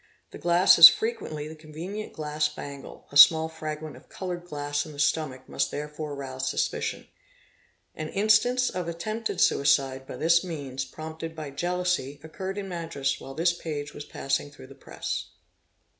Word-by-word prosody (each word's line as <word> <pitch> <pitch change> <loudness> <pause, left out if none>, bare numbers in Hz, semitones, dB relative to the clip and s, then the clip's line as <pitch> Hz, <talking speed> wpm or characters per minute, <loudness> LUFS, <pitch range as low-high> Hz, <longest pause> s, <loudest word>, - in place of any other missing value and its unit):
The - - -10
glass 175 +1 +5
is 165 0 +14
frequently 155 -9 -3
the 160 - -9
convenient 165 +7 -7
glass 150 0 -1
bangle 140 -2 -9
—a 145 - 0
small 160 +2 +8
fragment 155 -2 -6
of 130 - -17
coloured 180 -2 -5
glass 145 -2 -2
in 155 - -10
the 145 - -11
stomach 140 -4 0
must - - -1
therefore 150 0 -5
rouse 130 -2 -4
suspicion. - - -2 0.9
An 155 0 -6
instance 220 +5 +3
of 180 -2 -4
attempted 215 +4 -3
suicide 135 -3 +2
by - - -7
this 170 +2 +3
means, 140 -6 -5
prompted 160 +4 -8
by 155 -3 -6
jealousy, 175 -2 -1
occurred 190 +5 -6
in 200 -1 -4
Madras 165 -6 -3
while 135 - -9
this 170 +2 +2
page 150 -3 -5
was 145 - -7
passing 145 0 -2
through 145 - -14
the - - -13
press. - - -5
155 Hz, 160 wpm, -27 LUFS, 145-175 Hz, 0.9 s, is